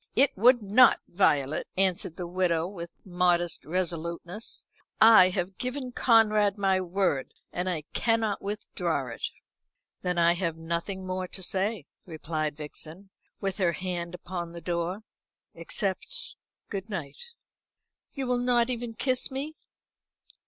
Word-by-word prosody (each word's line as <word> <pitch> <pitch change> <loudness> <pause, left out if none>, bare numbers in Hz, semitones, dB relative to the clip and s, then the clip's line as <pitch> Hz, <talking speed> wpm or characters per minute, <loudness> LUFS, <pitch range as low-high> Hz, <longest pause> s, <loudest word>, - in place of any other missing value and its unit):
"It 270 +3 +4
would 240 +3 +5
not. 215 +6 +6
Violet," 150 -6 +2
answered 185 -3 +1
the 180 - -4
widow, 170 -2 +1
with 170 -3 -7 0.2
modest 175 -2 +1
resoluteness. 170 +3 -3 0.3
"I 220 -4 +9
have 185 0 -3
given 255 0 -3
Conrad 215 -4 +4
my 190 -2 +2
word. 180 -7 -1 0.2
I 180 -3 -1
cannot 225 -3 +1
withdraw 180 -8 -2
it." 115 - -9 0.8
"Then 180 -1 -1
I 170 0 +5
have 170 -2 -2
nothing 170 +4 -3
more 185 0 -3
to 190 - -7
say," 195 -1 -1 0.2
replied 155 -2 -3
Vixen, 160 +5 -6 0.3
with 195 0 -2
her 175 -3 +2
hand 175 -1 -4
upon 175 -1 -6
the 170 - -7
door, 175 +4 -2 0.5
"except 205 - -3 0.4
good 200 0 -4
night." 190 - -6 0.8
"You 270 -2 -3
will 250 -1 +1
not 245 0 +2
even 235 -2 -4
kiss 255 0 +1
me?" 280 +4 -4
185 Hz, 130 wpm, -28 LUFS, 170-220 Hz, 0.8 s, I